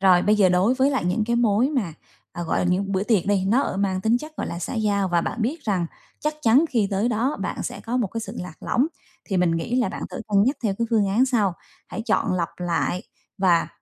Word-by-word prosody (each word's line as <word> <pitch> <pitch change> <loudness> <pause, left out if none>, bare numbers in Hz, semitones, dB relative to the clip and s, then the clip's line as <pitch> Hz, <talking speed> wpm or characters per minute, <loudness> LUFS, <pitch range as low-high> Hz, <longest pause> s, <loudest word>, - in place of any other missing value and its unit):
Rồi, 185 -2 +5
bây 210 - +4
giờ 195 -3 +5
đối 185 +8 +3
với 265 +2 +3
lại 260 -10 -1
những 210 +5 +1
cái 235 0 +1
mối 235 +2 +3
mà, 225 - -1 0.4
à, 175 - -5
gọi 165 - -1
là, - - +1
những 190 +2 0
bữa 190 - +1
tiệc 210 -5 +1
đi, 200 -2 +2
nó, 235 +8 +3
ở, - - -2
mang 190 -1 0
tính 225 +5 +2
chất, 310 +2 -10
gọi - - -3
là, 170 - -5
xã 175 - -4
giao 205 -3 +1
và 175 -1 +2
bạn 215 - -3
biết 290 +7 -2
rằng 185 -6 0 0.3
chắc 300 0 -1
chắn 245 +7 +5
khi 225 -6 +1
tới 200 +4 +1
đó 245 +5 0
bạn - - -3
sẽ - - -5
có 235 +2 -3
một 240 -5 +1
cái 225 +5 -5
sự 220 +2 -7
lạc 180 -3 -9
lõng, 260 +5 +2 0.4
thì 190 - -2
mình 180 -1 +3
nghĩ 230 +9 -2
là 250 - +2
bạn - - -6
thử - - -6
cân 200 -1 +4
nhắc 265 +5 +1
theo 200 -4 0
cái 230 - 0
phương 215 -3 +3
án 230 +7 +3
sau, 220 -7 +2 0.4
hãy 225 - -5
chọn 225 -3 +1
lọc 175 -3 0
lại 175 +1 -1 0.4
và 180 -3 +3
205 Hz, 265 wpm, -24 LUFS, 185-240 Hz, 0.4 s, Rồi